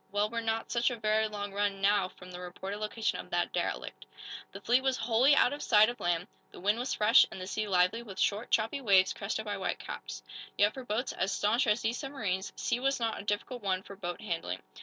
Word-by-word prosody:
"Well, 205 +1 0
we're 230 0 -2
not 225 0 -2
such 235 +1 +2
a 245 - -3
very 220 -1 +1
long 205 -1 -5
run, 200 -1 0
now, 200 -1 +3
from 180 0 -13
the 180 - -8
reported 190 +3 -6
location 215 +1 -1
of - - -8
that - - 0
derelict." - - -3 0.4
The - - -8
fleet 245 +3 +3
was 265 -1 +1
wholly 245 +5 +4
out 255 - +4
of 290 - -6
sight 215 -1 +5
of 245 - -6
land. 175 0 0 0.2
The - - -13
wind 205 +5 +1
was 250 +1 -1
fresh 215 +2 +6
and - - -8
the 185 - -5
sea 215 +3 -2
lively 185 +4 +2
with 200 -5 -10
short, 210 +3 0
choppy 225 +6 +1
waves, 195 -6 +4
crested 215 +2 -3
by 205 -1 -3
white 190 - -2
caps. - - -7 0.3
Yet, 205 +1 +4
for 260 - -7
boats 240 +2 -2
as 190 +1 -1
staunch 230 +7 +1
as 210 +2 +2
these 230 +2 0
submarines, 210 -10 -3
sea 240 - -1
was 270 +1 +1
not 225 -1 -1
a - - -13
difficult 230 +4 -2
one 190 -2 -1
for 200 - -10
boat 175 0 -5
handling. 170 -6 -4
210 Hz, 235 wpm, -31 LUFS, 195-235 Hz, 0.4 s, fresh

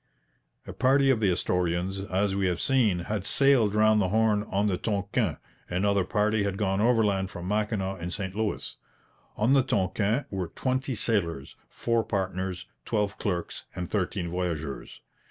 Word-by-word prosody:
A - - -7
party 135 +1 +4
of 120 - +2
the 105 -3 +2
Astorians, 90 +1 0
as 95 +1 +1
we 100 -1 +1
have 90 -2 -1
seen, 115 -10 +2
had 105 +2 -3
sailed 120 -3 +3
round 110 0 +4
the 95 - +1
Horn 110 0 +2
on 100 +2 +1
the 100 -3 +1
Tonquin; 100 -2 -1 0.3
another 100 +2 +1
party 105 +3 +1
had 100 -1 -1
gone 95 -1 0
overland 105 -5 +2
from 90 -3 -7
Mackinaw 105 -2 -1
and 85 0 -5
St 95 -1 -4
Louis. 110 0 -3 0.6
On 115 +5 +3
the 135 - +6
Tonquin 105 +4 0
were 95 -3 -2
twenty 130 +6 -2
sailors, 85 - -1
four 115 -1 0
partners, 95 -2 -3 0.2
twelve 105 -2 -1
clerks, 90 -4 -3
and 90 -1 -5
thirteen 95 -3 -1
voyageurs. 85 -6 -4
100 Hz, 155 wpm, -27 LUFS, 90-110 Hz, 0.6 s, the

